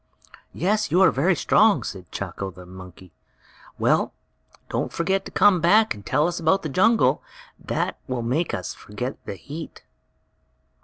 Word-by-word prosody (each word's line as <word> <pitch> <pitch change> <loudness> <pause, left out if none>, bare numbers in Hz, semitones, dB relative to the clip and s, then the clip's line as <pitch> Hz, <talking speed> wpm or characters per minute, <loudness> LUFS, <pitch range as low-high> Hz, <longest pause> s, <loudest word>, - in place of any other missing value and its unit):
"Yes, 210 +4 0
you 180 - +3
are - - +6
very 170 +7 +2
strong," 215 +3 +3
said 90 -2 -8
Chako, 95 - -5
the 90 0 -13
monkey. 90 -1 -13 0.7
"Well, - - +1 0.5
don't - - -2
forget 190 +3 -1
to - - -8
come 190 -3 +4
back 215 +6 +4
and 100 - -12
tell 145 +8 +1
us 175 0 -3
about 170 +4 +2
the 155 - -3
jungle. 150 - +3 0.4
That - - -3
will 125 -2 -3
make 140 +9 0
us 100 -6 -4
forget 125 +6 -7
the - - -4
heat." 150 - -9
155 Hz, 155 wpm, -23 LUFS, -, 0.7 s, are